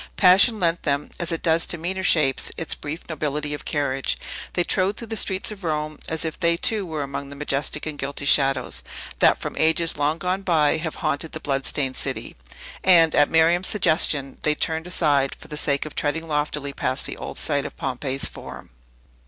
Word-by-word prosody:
Passion 200 +4 +6
lent 170 -1 +1
them 140 -1 -1
(as 170 0 -1
it 165 - -3
does 165 0 +3
to 170 - 0
meaner 185 +4 -3
shapes) 150 -7 +3
its 165 - -2
brief 150 +3 -7
nobility 150 -2 -3
of 145 - -7
carriage. 135 -2 -1 0.4
They 175 - +1
trod 190 +3 0
through 230 - -7
the 225 - -3
streets 190 -1 +1
of 200 -2 -10
Rome, 155 -2 -3
as 160 0 -2
if 160 - -5
they, 170 -1 +2
too, 205 +1 +1
were 155 -3 -3
among 140 0 -6
the 140 - -9
majestic 145 +1 -1
and 155 -2 -6
guilty 140 +1 -4
shadows, 135 -2 +2 0.4
that, - - +5
from - - -6
ages 160 +1 +2
long 150 +2 +1
gone 185 +2 -2
by, 160 -5 +2
have 160 0 -4
haunted 155 +1 -1
the 155 - -4
blood 135 -3 -1
stained 135 -3 -1
city. - - -1 0.5
And, 165 -4 +5
at 145 - +4
Miriam's 165 +3 +3
suggestion, 155 -8 +2
they 150 -1 +2
turned 160 +2 -2
aside, 145 -6 +2
for - - -14
the 150 - -5
sake 140 -1 0
of 155 - -8
treading 160 +2 -2
loftily 150 -2 -2
past 130 0 -2
the - - -5
old - - -7
site 145 -2 +1
of - - -8
Pompey's 135 +1 -1
Forum. - - -10
155 Hz, 200 wpm, -23 LUFS, 145-170 Hz, 0.5 s, Passion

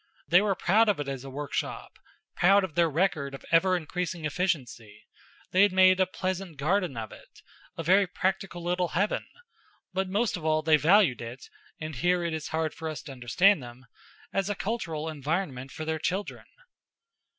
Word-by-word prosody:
They 180 +3 +6
were 205 -2 +1
proud 215 +6 +3
of 200 - +1
it 145 - -3
as 135 -2 -5
a 135 - -8
workshop, 145 +1 -5 0.4
proud 195 +3 +5
of 185 -5 -4
their 170 +1 +3
record 155 -4 0
of - - -12
ever 185 +2 +4
increasing 170 0 -4
efficiency; 140 - -3 0.5
they 185 - +4
had 205 -1 +5
made 185 0 +5
a 185 - +3
pleasant 185 -2 -4
garden 170 -1 0
of 110 -2 -5
it, - - -16 0.3
a 165 - -3
very 190 +4 +4
practical 185 -1 -2
little 180 +1 0
heaven; 205 +3 0 0.7
but 190 0 -1
most 210 +3 0
of 175 - -7
all 155 0 +1
they 155 -1 +5
valued 165 - +4
it 120 +3 -8 0.3
and 155 -3 -6
here 175 +5 +1
it 170 -1 -2
is 160 -1 -4
hard 160 -1 -2
for 160 0 -5
us 150 -6 -6
to 145 - -9
understand 135 - +3
them 120 +1 -11 0.5
as 195 +1 0
a 205 - -1
cultural 175 -8 -3
environment 145 -3 -3
for 155 - -6
their 160 0 -2
children. 190 +5 -3
170 Hz, 185 wpm, -28 LUFS, 150-190 Hz, 0.7 s, They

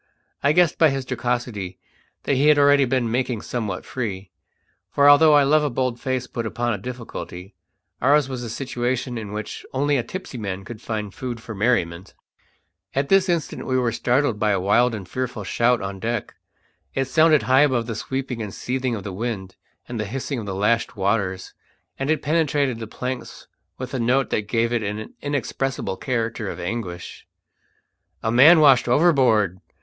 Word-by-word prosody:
I 140 - +3
guessed 175 0 +3
by 160 - +6
his 135 -1 -3
jocosity 120 -7 -3 0.5
that - - 0
he 140 +3 +3
had 150 -1 +6
already 145 -1 +5
been 125 -3 0
making 125 -2 -1
somewhat 105 -7 -4
free; 100 -6 -5 0.6
for 140 +6 +3
although 150 +2 +7
I 145 - +6
love 150 +2 +3
a 150 - +1
bold 125 -1 -1
face 130 -1 -1
put 115 -2 -4
upon 120 +1 -1
a 105 - -4
difficulty, 110 -5 -7 0.5
ours 140 +2 +4
was 130 -2 -5
a 120 - -5
situation 125 0 -2
in 110 -3 -6
which 105 0 -6
only 145 +2 +1
a 120 - 0
tipsy 160 -2 -7
man 95 -2 -5
could 115 -1 -9
find 105 -3 -4
food 125 -3 -5
for 115 0 -8
merriment. 95 -5 -1 0.8
At 140 +1 0
this 195 -1 +4
instant 170 -3 -2
we 130 - +1
were 125 -2 +1
startled 120 -1 +1
by 105 -1 +2
a 100 -2 +2
wild 115 +5 +3
and 95 -4 -7
fearful 120 0 -4
shout 120 +4 +1
on 95 0 -5
deck. 115 +2 -3 0.6
It 135 - +1
sounded 155 +2 +4
high 130 +4 +4
above 130 -5 +2
the 115 - -4
sweeping 130 +1 -4
and 105 -2 -5
seething 130 +3 -2
of 100 - -6
the 100 - -6
wind 100 -2 -4 0.3
and 120 -2 -5
the 110 - -1
hissing 135 +4 -4
of 105 - -7
the 95 - -3
lashed 115 +4 0
waters, 95 -2 -1 0.5
and 135 +2 -2
it 155 - +1
penetrated 145 -5 +1
the 110 - -6
planks 125 +3 -6 0.3
with 130 0 -6
a 130 - -1
note 125 +3 +1
that 105 -1 -1
gave 115 +1 +1
it 120 - +1
an 105 +1 -5
inexpressible 135 -6 -2
character 115 -2 -2
of - - -6
anguish. 90 -2 -5 1.0
"A 110 - 0
man 145 +8 +8
washed 135 -5 +6
overboard!" 120 - +3
120 Hz, 185 wpm, -23 LUFS, 110-135 Hz, 1.0 s, man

